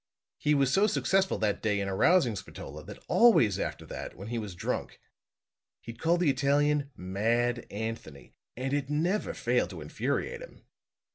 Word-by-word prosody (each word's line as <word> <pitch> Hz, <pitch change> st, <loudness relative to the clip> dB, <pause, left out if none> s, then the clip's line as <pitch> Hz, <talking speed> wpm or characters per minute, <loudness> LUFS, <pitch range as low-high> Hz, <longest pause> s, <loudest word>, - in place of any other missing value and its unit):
He 150 Hz, 0 st, +2 dB
was 135 Hz, -1 st, +2 dB
so 200 Hz, +3 st, +4 dB
successful 195 Hz, -1 st, +1 dB
that 105 Hz, -2 st, 0 dB
day 105 Hz, -2 st, +1 dB
in 100 Hz, -, -2 dB
arousing 120 Hz, -, +3 dB
Spatola, 75 Hz, -6 st, -8 dB
that -, -, -11 dB
always 130 Hz, -, +5 dB
after -, -, -4 dB
that, -, -, -7 dB
when 100 Hz, +4 st, -8 dB
he 120 Hz, 0 st, -2 dB
was 105 Hz, -5 st, -6 dB
drunk, -, -, -4 dB, 0.8 s
he'd 115 Hz, 0 st, -10 dB
call 170 Hz, +2 st, +3 dB
the 170 Hz, -5 st, +3 dB
Italian 140 Hz, +1 st, +1 dB
'Mad 115 Hz, +6 st, 0 dB
Anthony' 105 Hz, -10 st, -6 dB, 0.2 s
and 135 Hz, +2 st, -2 dB
it 145 Hz, -1 st, -1 dB
never 170 Hz, +8 st, 0 dB
failed -, -, +1 dB
to -, -, -8 dB
infuriate 475 Hz, 0 st, -2 dB
him. -, -, -13 dB
130 Hz, 160 wpm, -29 LUFS, 105-150 Hz, 0.8 s, always